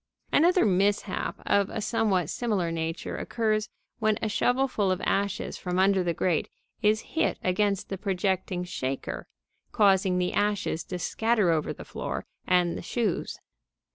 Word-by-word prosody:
Another 350 +1 +5
mishap 200 0 +1
of 200 -1 +2
a - - -4
somewhat 200 -6 +1
similar 205 -8 -1
nature 165 0 -3
occurs 215 -2 0 0.3
when 215 -2 +2
a 220 - -1
shovelful 245 -1 +1
of 185 0 +1
ashes 200 -1 -1
from 180 -1 -2
under 190 0 +4
the 175 - +1
grate 170 -2 0 0.3
is 215 0 +3
hit 320 - +1
against 200 +1 +1
the 195 - -4
projecting 190 -2 -1
shaker, 135 -6 -4 0.4
causing 190 -3 +3
the 180 0 0
ashes 205 -6 0
to 180 - -4
scatter 220 0 +1
over 155 -2 0
the - - -8
floor - - -4 0.2
and 180 -2 +3
the - - -5
shoes. 215 0 -2
195 Hz, 145 wpm, -27 LUFS, 180-215 Hz, 0.4 s, Another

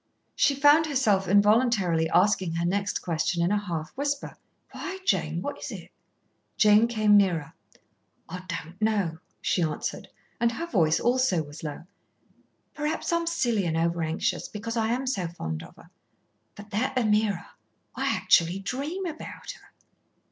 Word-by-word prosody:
She 280 - +3
found 290 +3 +5
herself 215 -10 +2
involuntarily 200 -5 +3
asking 185 -1 +2
her 170 0 -1
next 200 +3 -1
question 170 +1 0
in 175 - +1
a 210 - +2
half 165 -5 -4
whisper. 285 +1 -3 0.4
"Why, 380 0 -6
Jane, 170 - 0
what 285 - -5
is - - -6
it?" - - -9 0.7
Jane 215 +2 +6
came 215 -3 +3
nearer. 180 -7 +2 0.7
"I 180 +2 -7
don't 170 +2 -6
know," 200 -7 0 0.2
she 180 - +1
answered, 155 -3 -3 0.3
and 235 0 +2
her 335 - -4
voice 165 - +2
also 240 -9 +2
was 145 +1 -11
low. 150 +1 -6 0.9
"Perhaps 305 +3 -2
I'm 335 0 0
silly 240 - +1
and 160 0 -1
overanxious, 165 -1 -1
because 230 +2 -5
I 225 -1 +1
am 250 +4 -1
so 195 -9 -1
fond 80 - -5
of - - -13
her. - - -18 0.6
But 205 +1 -12
that 260 +6 -1
Ameerah, 210 -5 +1 0.4
I - - -1
actually 170 +2 +3
dream 280 - -4
about 320 -3 -7
her." - - -16
205 Hz, 150 wpm, -26 LUFS, 170-250 Hz, 0.9 s, Jane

